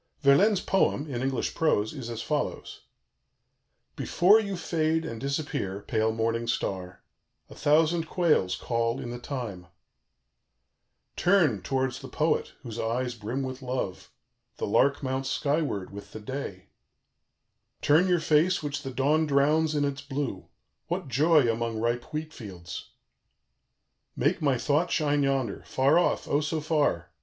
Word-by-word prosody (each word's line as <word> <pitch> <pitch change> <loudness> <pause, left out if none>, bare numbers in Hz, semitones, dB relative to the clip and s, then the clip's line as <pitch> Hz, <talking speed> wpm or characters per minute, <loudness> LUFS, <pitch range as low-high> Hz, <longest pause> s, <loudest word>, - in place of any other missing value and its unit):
Verlaine's 185 +8 +5
poem, 185 -6 +1
in 130 -5 -4
English 135 0 -1
prose, 110 -10 +1
is 130 -6 -6
as 115 -1 -4
follows: 150 -1 -3 1.1
"Before 200 +5 +4
you 200 -3 -3
fade 160 -1 0
and 115 -8 -6
disappear, 140 -9 -2
pale 110 +1 0
morning 115 +1 -1
star 95 -5 -3 0.5
a - - -8
thousand 160 +2 +2
quails 155 - +2
call 115 +1 -1
in 120 - -5
the 120 - -6
thyme 115 -9 -6 1.5
"Turn 175 - +3
towards 130 +2 -1
the 135 - -9
poet, 155 +5 0
whose 115 -3 -6
eyes 120 +2 -1
brim 120 +4 -4
with 130 +1 -5
love 125 -7 -4 0.5
the - - -2
lark 140 +1 +2
mounts 130 0 -2
skyward 140 - -1
with 100 0 -10
the 110 - -6
day 105 -5 -6 1.1
"Turn 160 +6 +5
your 180 -1 +3
face 160 +3 +2
which 145 0 -3
the 135 - -5
dawn 145 +5 +2
drowns 150 +2 +3
in 145 -1 +2
its 140 0 -3
blue 135 -8 -4 0.4
what - - -3
joy 150 +2 +4
among 115 -1 -1
ripe 120 +1 -1
wheat 155 +1 -4
fields! 90 -7 -8 1.3
"Make 145 +7 +1
my 140 -4 +2
thought 150 +7 +1
shine 145 -2 +1
yonder 135 -6 0
far 140 +6 +3
off, 175 - 0
O 145 - +2
so 155 +1 -1
far! 145 - 0
135 Hz, 145 wpm, -27 LUFS, 115-155 Hz, 1.5 s, Verlaine's